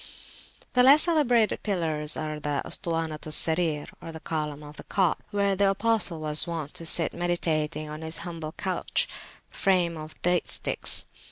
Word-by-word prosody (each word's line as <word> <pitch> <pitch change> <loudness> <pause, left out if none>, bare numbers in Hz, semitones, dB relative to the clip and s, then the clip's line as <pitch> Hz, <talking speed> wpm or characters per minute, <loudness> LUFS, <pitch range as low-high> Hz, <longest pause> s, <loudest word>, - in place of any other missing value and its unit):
The 250 - +4
less 275 +4 +8
celebrated 255 -10 +2
pillars 160 -6 -2
are 155 -1 -4
the 145 -1 -2
Ustuwanat 165 -2 -2
al - - -6
Sarir, 160 -2 +1 0.2
or 165 - -8
Column 150 -2 -4
of 150 0 -12
the - - -9
Cot, 190 -5 +1
where 200 -1 0
the 200 0 +2
Apostle 205 -4 +2
was 150 +2 +3
wont 160 -4 -5
to 165 - -4
sit 165 0 +3
meditating 155 -3 -1
on 150 +1 -8
his 160 +1 0
humble 165 -3 -6
couch 185 -2 -2 0.4
frame 180 -4 +1
of 155 0 -10
date 175 0 +1
sticks. - - +2
165 Hz, 160 wpm, -26 LUFS, 155-190 Hz, 0.4 s, less